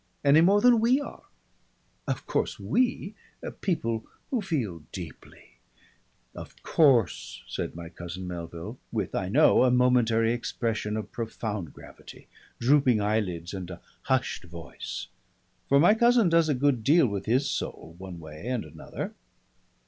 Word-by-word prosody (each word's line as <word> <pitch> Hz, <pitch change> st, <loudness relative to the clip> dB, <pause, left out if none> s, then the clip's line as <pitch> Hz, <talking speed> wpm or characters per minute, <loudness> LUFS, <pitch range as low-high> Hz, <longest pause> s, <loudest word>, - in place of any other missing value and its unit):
Any 145 Hz, +3 st, +7 dB
more 200 Hz, +4 st, +5 dB
than 245 Hz, -1 st, +6 dB
we 240 Hz, +5 st, +3 dB
are. 285 Hz, -, -8 dB, 0.9 s
Of -, -, -3 dB
course -, -, -1 dB
we 245 Hz, -5 st, 0 dB, 0.5 s
people 115 Hz, -, -1 dB, 0.3 s
who 250 Hz, -4 st, +1 dB
feel 120 Hz, -, -2 dB
deeply 85 Hz, -6 st, -11 dB, 0.3 s
" -, -, -38 dB, 0.3 s
"Of -, -, -11 dB
course," 130 Hz, -, +2 dB
said -, -, -4 dB
my 85 Hz, -1 st, -8 dB
cousin 90 Hz, +1 st, -7 dB
Melville, 85 Hz, -1 st, -7 dB
with, -, -, -2 dB
I -, -, -2 dB
know, -, -, +5 dB
a 130 Hz, -, +4 dB
momentary 120 Hz, -2 st, +3 dB
expression 115 Hz, -3 st, -2 dB
of 110 Hz, -, -6 dB
profound 110 Hz, -6 st, -4 dB
gravity, -, -, -14 dB, 0.3 s
drooping 130 Hz, -2 st, +4 dB
eyelids 100 Hz, -5 st, -1 dB
and 95 Hz, -2 st, -6 dB
a 90 Hz, -1 st, -9 dB, 0.2 s
hushed 130 Hz, -7 st, -1 dB
voice. 85 Hz, -1 st, -7 dB, 0.6 s
For 140 Hz, -, +5 dB
my 175 Hz, +7 st, +6 dB
cousin 235 Hz, -3 st, +4 dB
does 165 Hz, -1 st, +3 dB
a 145 Hz, -, +2 dB
good 130 Hz, -3 st, +1 dB
deal 155 Hz, +5 st, +5 dB
with 100 Hz, -3 st, -3 dB
his 130 Hz, +5 st, +2 dB
soul, 80 Hz, -, -4 dB
one 95 Hz, -2 st, -8 dB
way 80 Hz, +5 st, -9 dB
and 125 Hz, -7 st, -2 dB
another. 75 Hz, +1 st, -7 dB
115 Hz, 145 wpm, -27 LUFS, 90-150 Hz, 0.9 s, Any